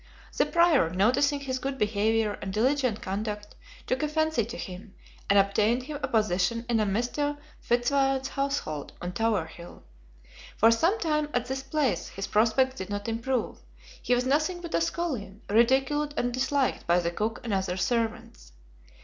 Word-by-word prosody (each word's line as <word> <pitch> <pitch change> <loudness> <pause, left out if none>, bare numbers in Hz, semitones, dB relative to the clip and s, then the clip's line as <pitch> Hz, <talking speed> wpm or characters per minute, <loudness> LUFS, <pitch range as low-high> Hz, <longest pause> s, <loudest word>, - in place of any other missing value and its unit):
The - - +2
prior, 340 - +4
noticing 255 - +2
his 260 -2 -3
good 270 +1 -3
behavior 215 0 +1
and 190 - -4
diligent 250 +1 +1
conduct, 210 +1 -4 0.3
took 255 - -1
a 305 - +1
fancy 315 -4 +1
to 235 +4 -7
him, 195 +2 -8 0.3
and 200 - +5
obtained 210 +5 +3
him 290 +2 -6
a 265 - -1
position 220 0 +1
in 235 -2 +2
a 215 - +1
Mr. 250 +8 -1 0.2
Fitzwarren's 270 +2 +1
household 275 - -3
on 175 - -4
Tower 215 -4 0
Hill. 170 +2 -12 0.7
For 225 +1 +6
some 330 - +2
time 300 -2 0
at 245 -1 +1
this 265 +1 -3
place 270 -2 -1
his 195 - -5
prospects 235 +5 +2
did 190 - -6
not 205 +2 -4
improve; 230 +1 -2 0.4
he 245 - +2
was 245 +1 0
nothing 310 +6 +1
but 340 -2 -8
a - - +2
scullion, 255 - -3
ridiculed 270 +7 +2
and 245 0 0
disliked 265 +1 0
by 170 +1 +4
the 170 -1 -1
cook 215 +5 -2
and 230 -4 -2
other 190 -1 -1
servants. 220 - -2
240 Hz, 165 wpm, -27 LUFS, 205-275 Hz, 0.7 s, For